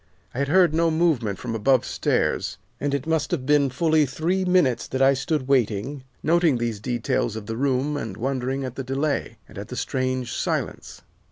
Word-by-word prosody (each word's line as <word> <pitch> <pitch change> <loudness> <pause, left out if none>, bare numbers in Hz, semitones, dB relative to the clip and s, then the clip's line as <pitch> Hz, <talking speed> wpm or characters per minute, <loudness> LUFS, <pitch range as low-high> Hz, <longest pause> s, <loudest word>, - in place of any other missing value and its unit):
I 125 - -4
had 140 - +1
heard 175 +1 +4
no 165 +1 +3
movement 155 - +1
from 120 -2 -5
above 125 +3 +2
stairs, - - 0 0.2
and 140 -1 0
it 140 - -3
must 160 -2 0
have 150 -8 -2
been 145 -1 +3
fully 155 +2 +2
three 170 +8 -1
minutes 180 -10 +2
that 130 - -3
I 135 +1 +6
stood 135 0 -2
waiting, 130 +1 0 0.2
noting 165 -3 +3
these 115 -3 -2
details 120 -1 -1
of 110 -2 -6
the 115 - -4
room 135 +3 0
and 110 -8 -5
wondering 130 +2 -2
at 130 -2 -4
the 135 - -5
delay, 140 +3 -2
and - - -10
at - - -7
the - - -7
strange 130 -1 -2
silence. - - -3
135 Hz, 190 wpm, -24 LUFS, 125-155 Hz, 0.2 s, I